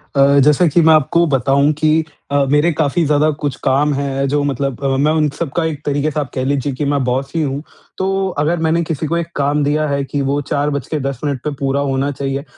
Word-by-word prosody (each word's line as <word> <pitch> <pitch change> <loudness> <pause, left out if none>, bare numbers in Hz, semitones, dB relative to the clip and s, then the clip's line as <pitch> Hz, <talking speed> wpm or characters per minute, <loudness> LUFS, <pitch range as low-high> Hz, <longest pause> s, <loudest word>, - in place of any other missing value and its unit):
अ, 140 +1 +5
जैसे 150 +4 +4
कि 170 +4 +3
मैं 160 0 +6
आपको 165 +3 +3
बताऊँ 140 +3 +2
कि 155 +2 +2 0.3
अ, 140 -1 +2
मेरे 150 +4 +3
काफ़ी 160 +2 0
ज़्यादा 150 +1 +2
कुछ 145 - -1
काम 145 +2 +2
है, 140 0 -1
जो 145 +1 +1
मतलब 140 -1 -2
अ, - - +1
मैं 150 +3 +2
उन 155 -1 +2
सबका 170 +1 -1
एक 150 -3 -3
तरीक़े 145 +1 0
से 150 - -2
आप 140 - -3
कह 130 - -1
लीजिए 140 0 -1
कि 145 +3 -3
मैं 140 -2 0
बॉस 130 +2 -2
ही 165 - +1
हूँ, 140 -1 -2 0.4
तो 195 0 0
अगर 165 +4 +1
मैंने 165 +2 +2
किसी 160 -1 -3
को 170 +2 0
एक 170 -1 -2
काम 145 +1 +1
दिया 150 +2 +1
है 140 -1 -1
कि 140 +1 -3
वो 140 +1 0
4 145 +2 -1
बज 140 -2 -3
के 155 - -2
10 135 -2 -3
मिनट 140 -4 -2
पे 150 - -2
पूरा 135 0 0
होना 135 0 -1
चाहिए, 135 0 -3
145 Hz, 245 wpm, -17 LUFS, 140-155 Hz, 0.4 s, मैं